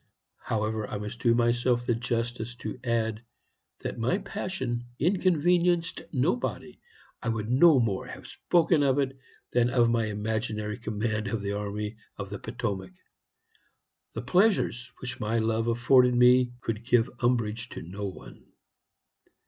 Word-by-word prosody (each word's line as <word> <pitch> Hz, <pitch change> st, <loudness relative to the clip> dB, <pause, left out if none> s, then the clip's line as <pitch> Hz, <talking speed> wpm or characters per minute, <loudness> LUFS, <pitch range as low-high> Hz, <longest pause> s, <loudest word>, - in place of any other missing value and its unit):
However, 110 Hz, 0 st, -1 dB
I 105 Hz, -, -3 dB
must 105 Hz, +3 st, -6 dB
do 120 Hz, -2 st, +3 dB
myself 120 Hz, +1 st, +2 dB
the 120 Hz, -, +2 dB
justice 120 Hz, 0 st, -2 dB
to 110 Hz, 0 st, -6 dB
add 115 Hz, -2 st, -1 dB, 0.6 s
that -, -, -5 dB
my 120 Hz, +11 st, +1 dB
passion 130 Hz, -, -3 dB
inconvenienced 175 Hz, 0 st, +2 dB
nobody. 160 Hz, -, -1 dB, 0.4 s
I 115 Hz, -, -2 dB
would 110 Hz, 0 st, -2 dB
no 145 Hz, +2 st, +6 dB
more 105 Hz, -5 st, -1 dB
have -, -, -9 dB
spoken 165 Hz, -2 st, +2 dB
of 135 Hz, -1 st, +3 dB
it 135 Hz, -1 st, 0 dB, 0.4 s
than 120 Hz, 0 st, +3 dB
of 120 Hz, -2 st, +3 dB
my 115 Hz, -2 st, +1 dB
imaginary 105 Hz, +1 st, -3 dB
command 110 Hz, -1 st, -2 dB
of 105 Hz, 0 st, -2 dB
the 100 Hz, 0 st, -2 dB
army 105 Hz, +1 st, -4 dB, 0.2 s
of 100 Hz, -1 st, -6 dB
the 100 Hz, -, -5 dB
Potomac. 100 Hz, -6 st, -4 dB, 1.2 s
The 110 Hz, -, -5 dB
pleasures 180 Hz, -, +2 dB
which 125 Hz, 0 st, -6 dB
my 110 Hz, +2 st, 0 dB
love 115 Hz, 0 st, 0 dB
afforded 125 Hz, +2 st, +4 dB
me 125 Hz, 0 st, +5 dB
could 115 Hz, 0 st, -3 dB
give 120 Hz, -1 st, +3 dB
umbrage 115 Hz, -1 st, 0 dB
to -, -, -7 dB
no 100 Hz, +4 st, -6 dB
one. 95 Hz, -, -11 dB
120 Hz, 140 wpm, -28 LUFS, 110-130 Hz, 1.2 s, no